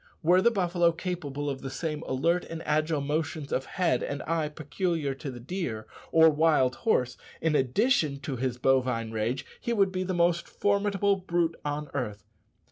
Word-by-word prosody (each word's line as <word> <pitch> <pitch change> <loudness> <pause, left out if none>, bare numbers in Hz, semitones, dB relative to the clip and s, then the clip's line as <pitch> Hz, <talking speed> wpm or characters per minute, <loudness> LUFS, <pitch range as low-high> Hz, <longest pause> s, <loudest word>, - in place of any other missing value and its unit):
Were 180 +3 +5
the 235 - +5
buffalo 175 -5 +2
capable 160 -5 -4
of 135 -2 -3
the 135 - -5
same 150 +3 -3
alert 165 +7 +1
and 165 0 -6
agile 155 0 +1
motions 150 0 -2
of 130 - 0
head 180 -3 0
and 140 - -3
eye 160 -2 -1
peculiar 155 0 -2
to 135 +1 -7
the 125 -2 -7
deer 120 - -4 0.3
or 160 0 +7
wild 150 -4 +3
horse, 130 - +1 0.2
in 160 -2 +1
addition 150 - +2
to 135 0 -4
his 125 0 -2
"bovine 125 -3 +1
rage," 115 +4 -2
he 235 - -2
would 195 -4 +3
be 185 0 -2
the 185 0 -2
most 170 0 +2
formidable 200 -1 +1
brute 175 -3 0
on 145 0 -3
earth. 105 -7 -3
155 Hz, 175 wpm, -28 LUFS, 135-175 Hz, 0.3 s, or